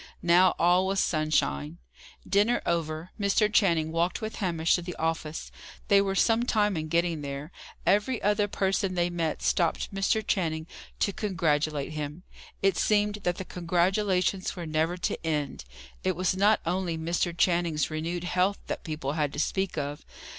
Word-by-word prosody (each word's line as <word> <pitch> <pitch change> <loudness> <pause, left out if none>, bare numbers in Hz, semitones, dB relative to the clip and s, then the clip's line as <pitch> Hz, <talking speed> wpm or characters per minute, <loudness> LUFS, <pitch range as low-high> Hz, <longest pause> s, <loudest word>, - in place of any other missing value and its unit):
Now, 175 +2 +5
all 180 +2 +3
was 195 0 0
sunshine. 85 - 0 0.5
Dinner 205 +5 +2
over, 165 0 -2
Mr. 210 +1 +2
Channing 165 -7 +3
walked 170 +2 0
with 220 -1 -5
Hamish 165 -4 +1
to 175 - +2
the 175 +1 -6
office. 160 -1 -3 0.4
They 200 0 +6
were 195 -1 -1
some 225 +4 +3
time 210 -4 +1
in 155 -1 -3
getting 170 -1 0
there. 140 +3 -6 0.3
Every 210 +6 +2
other 205 0 +2
person 195 -1 0
they 175 0 +1
met, 165 -3 -2
stopped 170 +3 0
Mr. 200 +2 +1
Channing 160 -6 -1 0.4
to 200 - +2
congratulate 155 -8 0
him. 150 +3 -5 0.4
It 195 0 +3
seemed 210 0 +2
that 175 0 0
the 190 - -5
congratulations 185 +2 0
were 175 -2 -5
never 160 +3 0
to 175 - -3
end. 150 - -2 0.4
It 185 -1 +1
was 185 +2 0
not 205 +3 +3
only 175 -1 -1
Mr. 170 +2 -1
Channing's 170 -4 +1
renewed 165 +3 -3
health 185 +2 +1
that - - -4
people 155 -5 -3
had 150 -2 -1
to - - -4
speak 190 +3 -1
of. 145 0 -4
175 Hz, 160 wpm, -28 LUFS, 160-195 Hz, 0.5 s, They